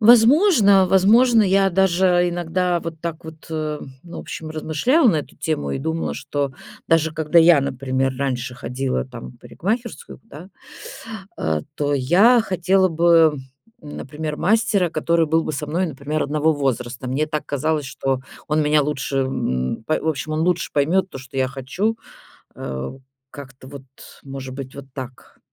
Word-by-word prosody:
Возможно, 230 Hz, -, +6 dB
возможно, 220 Hz, +5 st, +5 dB
я 195 Hz, 0 st, +3 dB
даже 180 Hz, -1 st, +3 dB
иногда 175 Hz, 0 st, -1 dB
вот 165 Hz, -1 st, -7 dB
так 165 Hz, -1 st, -5 dB
вот, 160 Hz, 0 st, -11 dB
ну, 155 Hz, -2 st, -4 dB
в 175 Hz, -1 st, -9 dB
общем, 160 Hz, -, -7 dB
размышляла 160 Hz, -, +1 dB
на 170 Hz, -, +3 dB
эту 150 Hz, -, -6 dB
тему 155 Hz, -2 st, -2 dB
и -, -, -2 dB
думала, 160 Hz, +4 st, -2 dB
что 140 Hz, -2 st, -3 dB, 0.4 s
даже 160 Hz, -1 st, +2 dB
когда 160 Hz, +1 st, +2 dB
я, 165 Hz, -3 st, +6 dB
например, 135 Hz, 0 st, -1 dB
раньше 125 Hz, -3 st, -2 dB
ходила, 130 Hz, +2 st, -3 dB
там, 125 Hz, -3 st, -10 dB
в 120 Hz, -, -21 dB
парикмахерскую, 225 Hz, -, -5 dB
да, 180 Hz, -3 st, -12 dB, 0.9 s
а, 80 Hz, -1 st, -1 dB
то 145 Hz, 0 st, 0 dB
я 185 Hz, -, +5 dB
хотела 190 Hz, -1 st, +2 dB
бы, 165 Hz, -2 st, +4 dB, 0.4 s
например, 150 Hz, 0 st, -6 dB
мастера, 210 Hz, -3 st, +2 dB
который 165 Hz, +1 st, +1 dB
был 160 Hz, +1 st, +2 dB
бы -, -, -3 dB
со 150 Hz, +1 st, -4 dB
мной, 175 Hz, +5 st, -1 dB
например, 150 Hz, +1 st, -3 dB
одного 150 Hz, +2 st, +1 dB
возраста. 130 Hz, -3 st, -3 dB
Мне 140 Hz, +5 st, 0 dB
так 150 Hz, -1 st, -4 dB
казалось, 150 Hz, 0 st, -1 dB
что 135 Hz, 0 st, -2 dB, 0.3 s
он 155 Hz, +1 st, +2 dB
меня 150 Hz, 0 st, +3 dB
лучше 140 Hz, -1 st, -2 dB
н 65 Hz, -, -2 dB
па 155 Hz, -, +1 dB
в 160 Hz, -, -2 dB
общем, 155 Hz, 0 st, -2 dB
он 155 Hz, -, -1 dB
лучше 175 Hz, +1 st, 0 dB
поймёт 170 Hz, +7 st, +2 dB
то, -, -, -8 dB
что 130 Hz, +1 st, -11 dB
я 130 Hz, -1 st, +1 dB
хочу. 180 Hz, -, -2 dB, 0.6 s
Э, 65 Hz, 0 st, -5 dB, 0.4 s
как-то 135 Hz, -2 st, -12 dB
вот, 140 Hz, -1 st, -10 dB, 0.4 s
может 135 Hz, -1 st, -7 dB
быть, 135 Hz, -1 st, -7 dB
вот 140 Hz, -1 st, -9 dB
так. 130 Hz, -2 st, -10 dB
155 Hz, 160 wpm, -21 LUFS, 135-180 Hz, 0.9 s, Возможно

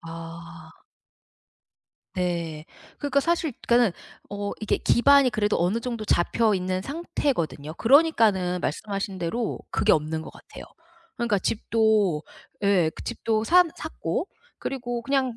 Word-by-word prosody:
아. 165 Hz, -1 st, -10 dB, 1.4 s
네. 170 Hz, -4 st, -2 dB, 0.3 s
그러니까 280 Hz, -1 st, +1 dB
사실 335 Hz, -2 st, 0 dB
그러니까는 235 Hz, -4 st, +4 dB, 0.4 s
어 205 Hz, 0 st, -4 dB
이게 215 Hz, -, +1 dB
기반이 280 Hz, +1 st, +4 dB
그래도 210 Hz, -1 st, +1 dB
어느 215 Hz, +6 st, 0 dB
정도 230 Hz, -3 st, -4 dB
잡혀있는 185 Hz, -1 st, +1 dB
상태거든요. 250 Hz, -, -2 dB
그러니까는 225 Hz, -, +3 dB
말씀하신 200 Hz, +3 st, -3 dB
대로 210 Hz, +7 st, -2 dB
그게 -, -, +3 dB
없는 155 Hz, +1 st, 0 dB
것 -, -, -9 dB
같아요. -, -, -12 dB, 0.5 s
그러니까 235 Hz, -4 st, +1 dB
집도 215 Hz, -6 st, +1 dB, 0.4 s
예 190 Hz, -5 st, +3 dB
그 -, -, -9 dB
집도 225 Hz, -2 st, -1 dB
산 355 Hz, +4 st, +5 dB
샀고 390 Hz, -, -4 dB, 0.3 s
그리고 245 Hz, -3 st, -4 dB
그냥 265 Hz, -3 st, 0 dB
210 Hz, 280 characters per minute, -25 LUFS, 175-245 Hz, 1.4 s, 산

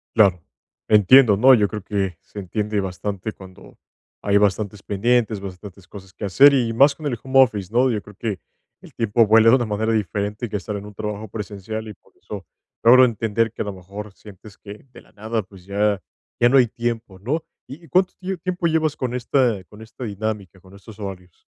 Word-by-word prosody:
Claro, 95 Hz, -6 st, +4 dB, 0.5 s
entiendo, 105 Hz, +2 st, +6 dB
¿no?, 130 Hz, +6 st, +6 dB
yo 105 Hz, -3 st, +2 dB
creo 105 Hz, -1 st, -7 dB
que 95 Hz, -3 st, -2 dB
se 105 Hz, -, -10 dB
entiende 105 Hz, +2 st, -2 dB
bastante 100 Hz, +2 st, -4 dB
cuando 95 Hz, -1 st, -15 dB, 0.4 s
hay 100 Hz, 0 st, +2 dB
bastantes 100 Hz, 0 st, 0 dB
pendientes, 110 Hz, 0 st, 0 dB
bastantes 95 Hz, -1 st, -10 dB
cosas 95 Hz, -2 st, -12 dB
que -, -, -10 dB
hacer, 135 Hz, +10 st, +6 dB
y 120 Hz, -4 st, +1 dB
más 140 Hz, +5 st, +4 dB
con 155 Hz, -, -10 dB
el 125 Hz, -6 st, -2 dB
home 135 Hz, 0 st, +5 dB
office, 105 Hz, -7 st, -3 dB
¿no? 125 Hz, +1 st, +3 dB
Yo 105 Hz, -, -2 dB
creo 105 Hz, 0 st, -15 dB
que 105 Hz, -2 st, -4 dB, 0.4 s
el -, -, -16 dB
tiempo 115 Hz, 0 st, +2 dB
vuela 110 Hz, +1 st, +6 dB
de 125 Hz, -, +7 dB
una 120 Hz, -, -1 dB
manera 110 Hz, +1 st, -1 dB
diferente 105 Hz, +2 st, -2 dB
que 105 Hz, -, -6 dB
estar 105 Hz, +1 st, -4 dB
en 100 Hz, -, -8 dB
un 105 Hz, -, -11 dB
trabajo 105 Hz, +1 st, -5 dB
presencial, 110 Hz, +1 st, -6 dB
y 105 Hz, -, -8 dB
por -, -, -30 dB
eso -, -, -9 dB, 0.4 s
logro 125 Hz, +3 st, +7 dB
entender 115 Hz, -2 st, 0 dB
que -, -, -7 dB
a -, -, -10 dB
lo 100 Hz, -, -4 dB
mejor 100 Hz, +3 st, -9 dB
sientes 105 Hz, +1 st, -15 dB
que, 105 Hz, +3 st, -12 dB
de -, -, -13 dB
la -, -, -24 dB
nada, 110 Hz, +1 st, -3 dB
pues, 95 Hz, -1 st, -17 dB
ya 100 Hz, -1 st, 0 dB, 0.4 s
ya 120 Hz, -, +5 dB
no 135 Hz, +2 st, +5 dB
hay 125 Hz, -, +4 dB
tiempo, 115 Hz, -4 st, -4 dB
¿no?, 145 Hz, -, -2 dB, 0.2 s
¿y 145 Hz, +6 st, -11 dB
y 165 Hz, -, -17 dB
cuánto 185 Hz, +6 st, +2 dB
tio 190 Hz, 0 st, -4 dB
tiempo 180 Hz, 0 st, -2 dB
llevas 155 Hz, -2 st, 0 dB
con 125 Hz, -2 st, -3 dB
esta 120 Hz, -6 st, 0 dB
con 105 Hz, +3 st, -15 dB
esta 115 Hz, +3 st, -9 dB
dinámica, 100 Hz, -3 st, -5 dB
con 95 Hz, +1 st, -18 dB
estos 100 Hz, +2 st, -14 dB
horarios? 95 Hz, -4 st, -9 dB
105 Hz, 210 wpm, -21 LUFS, 100-120 Hz, 0.5 s, de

